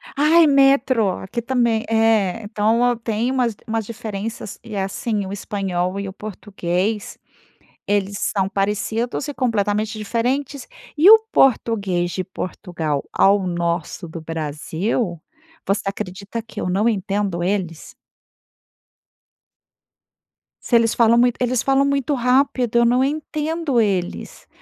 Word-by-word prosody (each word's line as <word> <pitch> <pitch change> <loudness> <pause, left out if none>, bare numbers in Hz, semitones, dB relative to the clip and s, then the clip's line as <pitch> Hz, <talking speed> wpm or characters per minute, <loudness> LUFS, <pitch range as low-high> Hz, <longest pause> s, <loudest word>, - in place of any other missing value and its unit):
Ai, 320 +4 +5
metro! 270 -5 +4
Aqui 235 +5 -5
também 235 -2 +1
É, 225 -2 +2
então 220 +3 +1
eu 245 -1 +1
tenho 230 +2 -1
umas 245 -4 0
umas 225 -1 -2
diferenças. 215 -1 -6
E, 225 -2 -8
assim, 200 +2 -2
o 190 - -6
espanhol 195 -2 -2
e 200 - -4
o 190 - -7
português 200 0 -3 0.7
eles 200 -1 0
são 195 -3 0
parecidos 210 +7 -2
e 290 - -4
completamente 215 -3 0
diferentes. 250 +6 -2 0.3
E 330 +6 +7
o 440 +1 +10
português 200 - +2
de 185 +1 -3
Portugal 170 -6 -4
ao 195 -1 +3
nosso 170 0 -2
do 165 +1 -7
Brasil, 165 - -3 0.4
você 200 +1 0
acredita 200 +3 -5
que 225 - -8
eu - - -2
não 200 +5 +2
entendo 195 -4 -1
eles? 180 -4 -3 2.7
Se 240 - +1
eles 230 -1 +4
falam 235 0 +4
muito 245 0 +3
eles 250 -1 +1
falam 275 0 +3
muito 280 0 0
rápido 250 -1 +2
eu 235 - +4
não 250 +2 +3
entendo 305 0 -1
eles, 190 -5 -2
215 Hz, 125 wpm, -21 LUFS, 195-245 Hz, 2.7 s, o